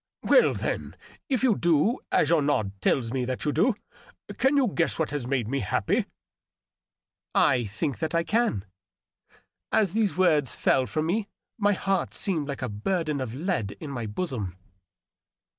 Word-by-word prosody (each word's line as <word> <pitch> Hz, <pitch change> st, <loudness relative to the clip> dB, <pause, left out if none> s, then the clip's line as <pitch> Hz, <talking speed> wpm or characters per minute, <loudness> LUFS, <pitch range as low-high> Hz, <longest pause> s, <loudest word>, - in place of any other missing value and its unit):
Well, -, -, +5 dB
then, -, -, -3 dB, 0.3 s
if 260 Hz, -3 st, 0 dB
you 245 Hz, -5 st, +4 dB
do, 170 Hz, -, +2 dB
as 155 Hz, -, +3 dB
your 165 Hz, -3 st, +4 dB
nod 140 Hz, -9 st, +1 dB
tells 120 Hz, +1 st, +1 dB
me 130 Hz, -2 st, 0 dB
that 130 Hz, +3 st, -3 dB
you 150 Hz, -, +2 dB
do, 200 Hz, -, +2 dB, 0.6 s
can 270 Hz, +2 st, +3 dB
you 270 Hz, -3 st, +4 dB
guess 170 Hz, -4 st, 0 dB
what 160 Hz, -3 st, -1 dB
has 145 Hz, -5 st, -3 dB
made 125 Hz, -4 st, 0 dB
me 135 Hz, +4 st, -1 dB
happy 95 Hz, -6 st, 0 dB, 0.5 s
?" -, -, -67 dB, 0.3 s
" -, -, -43 dB, 0.2 s
I 125 Hz, -2 st, 0 dB
think 120 Hz, +7 st, -3 dB
that 160 Hz, 0 st, -2 dB
I 165 Hz, -, +2 dB
can." 215 Hz, -, 0 dB, 1.1 s
As 200 Hz, -5 st, +2 dB
these 215 Hz, -4 st, +1 dB
words 155 Hz, -9 st, +3 dB
fell 130 Hz, -1 st, +2 dB
firom 155 Hz, +9 st, -1 dB
me 200 Hz, +5 st, 0 dB, 0.3 s
my 205 Hz, 0 st, +3 dB
heart 195 Hz, 0 st, -1 dB
seemed 160 Hz, -7 st, 0 dB
like 140 Hz, -2 st, -5 dB
a -, -, -1 dB
burden 150 Hz, -, -1 dB
of 125 Hz, -2 st, -4 dB
lead 150 Hz, -, -2 dB
in 150 Hz, -3 st, -6 dB
my 120 Hz, -4 st, -4 dB
bosom. 105 Hz, -, -4 dB
155 Hz, 175 wpm, -26 LUFS, 125-190 Hz, 1.1 s, Well